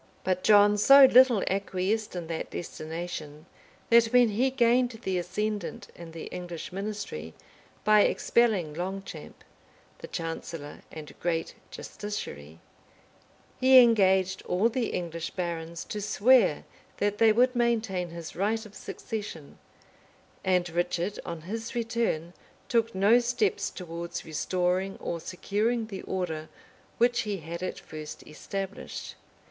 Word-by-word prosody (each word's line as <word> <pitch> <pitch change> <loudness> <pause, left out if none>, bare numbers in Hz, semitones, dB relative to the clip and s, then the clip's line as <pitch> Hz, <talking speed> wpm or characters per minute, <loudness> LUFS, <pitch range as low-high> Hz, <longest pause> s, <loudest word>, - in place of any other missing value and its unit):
] - - -32
But 185 -1 0
John 205 0 +6
so 275 +5 +9
little 255 -4 +6
acquiesced 195 +2 -1
in 175 -2 -4
that 160 0 -4
destination 160 -2 -6 0.5
that 235 0 +7
when 245 0 +5
he 240 +6 +1
gained 245 -1 +3
the 185 -1 0
ascendant 190 -1 -3
in 170 -1 -10
the 165 0 -8
English 175 -1 -6
ministry 195 - -5 0.5
by 215 0 +6
expelling 205 -9 +2
Longchamp, 190 +4 -6 0.6
the - - -8
chancellor 165 -2 -6
and 155 -2 -9
great 165 -1 -1 0.2
justiciary, 80 - -7 1.0
he 260 0 +7
engaged 190 -5 +4
all 195 +6 +2
the 240 -1 -1
English 170 -2 -4
barons 170 -2 -4
to 210 - -5
swear 230 +5 +4 0.3
that 205 0 -1
they 225 -1 +6
would 250 +3 +3
maintain 220 -7 0
his 170 -1 -8
right 220 +4 0
of 210 - -13
succession; 205 -10 -7 0.8
and 180 -2 +2
Richard, 175 +3 -1
on 170 -2 -5
his 220 +8 -6
return, 230 -8 -1 0.3
took 230 -3 +1
no 205 +5 +5
steps 240 -5 0
towards 170 -1 -6
restoring 180 +4 -1
or 170 - -4
securing 215 +7 -1
the 200 -3 -7
order 160 -4 -4 0.5
which 240 +1 +3
he 210 -2 -2
had 170 +1 -7
at 185 - -4
first 155 -1 -9
established. 195 +5 -6
190 Hz, 130 wpm, -28 LUFS, 170-225 Hz, 1.0 s, so